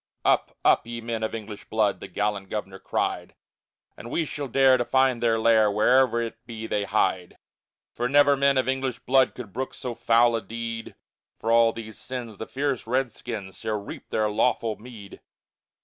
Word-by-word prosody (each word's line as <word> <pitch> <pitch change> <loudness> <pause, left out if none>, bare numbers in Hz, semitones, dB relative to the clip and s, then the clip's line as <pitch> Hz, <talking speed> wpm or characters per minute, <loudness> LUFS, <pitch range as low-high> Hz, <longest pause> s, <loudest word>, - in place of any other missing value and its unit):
II - - +6
Up, - - 0
up, - - +4
ye 120 0 -5
men 115 -1 -4
of 110 +1 -2
English 105 -2 -8
blood! 110 -2 +1
The - - -8
gallant 105 -2 -2
governor 95 -3 -5
cried, - - -2 0.6
And 115 - -10
we 165 +6 0
shall 145 -1 -5
dare 135 +1 +5
to 120 - 0
find 130 -1 +2
their 115 -1 +3
lair, 110 -1 +4
Where'er 120 +3 +3
it 115 - -7
be 110 -2 -6
they 105 -2 -1
hide. 95 -3 0 0.6
For 120 +1 -2
never 145 0 +5
men 140 0 +3
of 130 -1 +1
English 130 -2 -1
blood 130 +1 +3
Could 110 -7 -9
brook 130 +2 -4
so 125 -2 -5
foul 115 0 +3
a 115 - -1
deed, 115 +2 -6 0.4
For 115 - -2
all 115 0 +5
these 110 -2 -9
sins 120 -5 -6
the 110 - -6
fierce 135 -3 -2
redskins 115 -5 -3
Shall 110 -2 -2
reap 100 - -10
their 110 -1 +1
lawful 110 +1 +1
meed. 110 -3 -12
115 Hz, 185 wpm, -25 LUFS, 110-125 Hz, 0.6 s, II